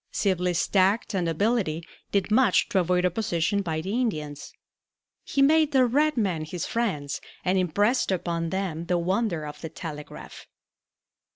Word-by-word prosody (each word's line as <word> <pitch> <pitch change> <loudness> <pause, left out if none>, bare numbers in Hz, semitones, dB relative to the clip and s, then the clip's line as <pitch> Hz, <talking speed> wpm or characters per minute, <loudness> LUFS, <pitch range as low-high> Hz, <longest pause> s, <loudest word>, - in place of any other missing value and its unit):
Sibley's 180 -3 0
tact 195 +4 +2
and 180 -3 0
ability 170 -2 0 0.3
did 200 +1 0
much 250 +3 +4
to 195 - +2
avoid 180 0 +1
opposition 180 0 0
by 160 -4 -2
the 190 - -4
Indians. 155 - -2 0.7
He 275 - +1
made 310 +1 +4
the 260 -2 +5
red 290 +4 +2
men 185 -8 0
his 165 +2 -4
friends 180 -12 -2 0.2
and 185 +1 +2
impressed 205 +7 +1
upon 170 -2 -1
them 175 -3 -3
the 180 - +2
wonder 180 -2 -1
of 150 - -8
the 160 - -5
telegraph. 155 -2 -9
185 Hz, 150 wpm, -26 LUFS, 165-220 Hz, 0.7 s, the